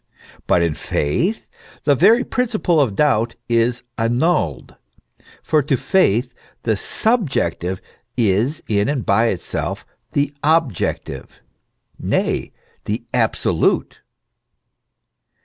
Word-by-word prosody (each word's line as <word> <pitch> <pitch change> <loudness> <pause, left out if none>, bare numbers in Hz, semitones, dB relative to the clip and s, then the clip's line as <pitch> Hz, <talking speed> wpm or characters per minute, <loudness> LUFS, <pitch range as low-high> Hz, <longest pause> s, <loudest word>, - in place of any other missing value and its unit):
But 85 - +3
in 85 -2 +1
faith 165 - -1 0.4
the 145 - +4
very 215 - +5
principle 215 -9 0
of 115 -8 0
doubt 115 -5 +2
is 120 +1 +1 0.2
annulled; 115 - 0 0.7
for 155 -1 +2
to 140 -1 0
faith 125 - +2 0.3
the 110 -2 +1
subjective 105 - 0 0.4
is 120 - +1
in 105 +3 +1
and 140 -5 -1
by 110 +4 +3
itself 95 -6 -3 0.3
the 145 0 0
objective 155 - -1 0.6
nay, - - -1 0.3
the 110 +3 -2
absolute. 115 -4 +1
125 Hz, 95 wpm, -20 LUFS, 105-160 Hz, 0.7 s, very